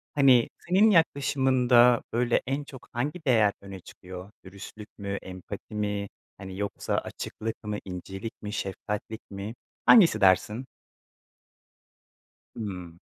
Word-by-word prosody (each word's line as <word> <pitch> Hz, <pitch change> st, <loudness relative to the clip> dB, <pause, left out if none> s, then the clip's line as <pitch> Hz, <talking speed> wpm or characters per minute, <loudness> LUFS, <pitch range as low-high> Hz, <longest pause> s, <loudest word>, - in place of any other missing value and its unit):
Hani, 130 Hz, -4 st, +5 dB
senin 190 Hz, +5 st, +4 dB
yaklaşımında, 130 Hz, -, +4 dB
böyle, 120 Hz, +1 st, +2 dB
en 135 Hz, +2 st, -1 dB
çok 135 Hz, -3 st, -12 dB
hangi 150 Hz, +7 st, -3 dB
değer 110 Hz, -6 st, +4 dB
öne 100 Hz, -1 st, -9 dB
çıkıyor? 90 Hz, +2 st, -11 dB
Dürüstlük 100 Hz, +3 st, -11 dB
mü, 100 Hz, -1 st, -4 dB
empati 95 Hz, +3 st, -9 dB
mi, 105 Hz, -1 st, -2 dB, 0.3 s
hani, 95 Hz, -1 st, -8 dB
yoksa 100 Hz, -1 st, -2 dB
açıklık 115 Hz, +1 st, -5 dB
mı, 105 Hz, -1 st, -3 dB
incelik 95 Hz, +4 st, -6 dB
mi, 105 Hz, -, -5 dB
şefkatlik 105 Hz, +2 st, -4 dB
mi? 100 Hz, +3 st, -6 dB, 0.3 s
Hangisi 205 Hz, -8 st, +7 dB
dersin? 105 Hz, +6 st, +3 dB, 1.9 s
Hımm. 90 Hz, -6 st, -6 dB
105 Hz, 115 wpm, -27 LUFS, 100-130 Hz, 1.9 s, Hangisi